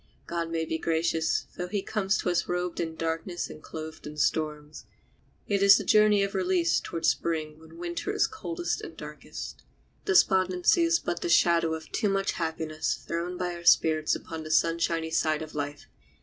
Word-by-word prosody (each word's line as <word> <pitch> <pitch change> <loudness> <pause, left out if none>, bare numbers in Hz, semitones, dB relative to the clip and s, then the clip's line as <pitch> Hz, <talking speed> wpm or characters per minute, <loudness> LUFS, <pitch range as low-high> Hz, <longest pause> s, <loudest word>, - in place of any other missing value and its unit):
God 170 -1 -3
may 165 -1 -1
be 160 0 -3
gracious, 165 0 0
though 180 - -3
he 195 +1 -2
comes 195 -3 0
to 180 - 0
us 170 -1 0
robed 180 0 -2
in 165 -1 -2
darkness 165 +2 -3
and 155 - -11
clothed 160 -1 -8
in 150 0 -9
storms. 150 -1 -1 0.6
It 200 -1 0
is 200 0 +8
a - - -3
journey 210 -1 +5
of 200 - -2
release 185 -3 +2
towards 165 - -1
the - - +1
Spring 155 -2 -3
when 160 - -15
Winter 345 0 -3
is - - +2
coldest 350 -5 -3
and - - -9
darkest. - - -8 0.4
Despondency 190 - +4
is 335 0 +4
but 175 - -4
the - - -2
shadow 170 -1 +4
of 160 -1 -10
too 210 - 0
much 195 0 +1
happiness 160 -1 -2
thrown 175 +2 -4
by 180 -1 -2
our 170 0 -9
spirits 155 -2 +4
upon 160 -1 -7
the 155 - -8
sunshiny 165 0 +1
side 155 -1 +1
of 155 - -10
life. 145 0 -4
170 Hz, 185 wpm, -28 LUFS, 160-190 Hz, 0.6 s, is